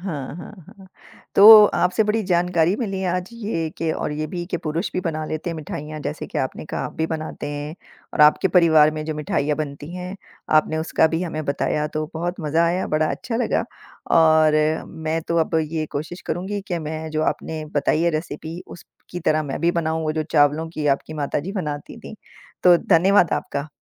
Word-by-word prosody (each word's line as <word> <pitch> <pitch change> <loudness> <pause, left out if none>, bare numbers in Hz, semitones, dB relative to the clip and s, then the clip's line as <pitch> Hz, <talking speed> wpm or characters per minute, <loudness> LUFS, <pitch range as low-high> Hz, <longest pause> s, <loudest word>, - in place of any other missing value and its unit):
हाँ, 150 -7 -5
हाँ, 180 - -9 0.2
हाँ। 195 - -15 0.5
तो 210 +1 +10
आपसे 180 +5 +2
बड़ी 215 +1 0
जानकारी 175 -1 +2
मिली 195 -5 -3
आज 180 +1 -1
ये 205 -9 -3
कि 165 -1 0
और 150 - -3
ये 155 +1 -3
भी 175 +2 -5
कि - - 0
पुरुष 165 +3 -3
भी - - -1
बना 155 -3 -3
लेते 155 +2 -4
हैं 165 - -4
मिठाइयाँ 155 0 -6
जैसे 150 +1 -5
कि - - -4
आपने 130 - -3
कहा - - -4
आप - - -6
भी 160 - 0
बनाते 155 -2 -5
हैं 145 +1 -5 0.4
और - - -1
आपके 150 +5 +5
परिवार 160 -4 +5
में 155 0 -5
जो 155 - -3
मिठाइयाँ 150 -1 -1
बनती 145 +1 -5
हैं, 180 +2 -6 0.4
आपने 155 +1 +2
उसका 160 0 +2
भी 165 +2 -1
हमें 155 -3 -4
बताया 150 +1 -1
तो 155 0 -1
बहुत 175 +3 -2
मज़ा 160 +2 +1
आया। 180 +2 0
बड़ा 155 0 +1
अच्छा 230 - -4
लगा 245 - 0 0.5
और 155 -1 +5 0.3
मैं 160 0 -3
तो 170 - 0
अब 165 - -8 0.2
ये 155 -1 -1
कोशिश 160 +5 -5
करूँगी 190 +5 -3
कि 175 - -1
मैं 160 0 -5
जो 155 0 -1
आपने 155 0 -2
बताई 150 +2 +1
है 170 - +3
रेसिपी 160 +1 -5
उसकी 175 0 -11
तरह 155 -1 +1
मैं 140 -3 -5
भी 170 +1 +3
बनाऊँ। 160 -1 -1
वो 155 -1 -1
जो 155 - -1
चावलों 150 +2 +3
की 155 -2 -3
आपकी 140 +2 0
माताजी 150 +4 -3
बनाती 150 -7 -5
थीं, - - -10 0.5
तो 180 -1 +7
धन्यवाद 180 +1 +3
आपका। 140 +2 -3
160 Hz, 200 wpm, -22 LUFS, 155-175 Hz, 0.5 s, तो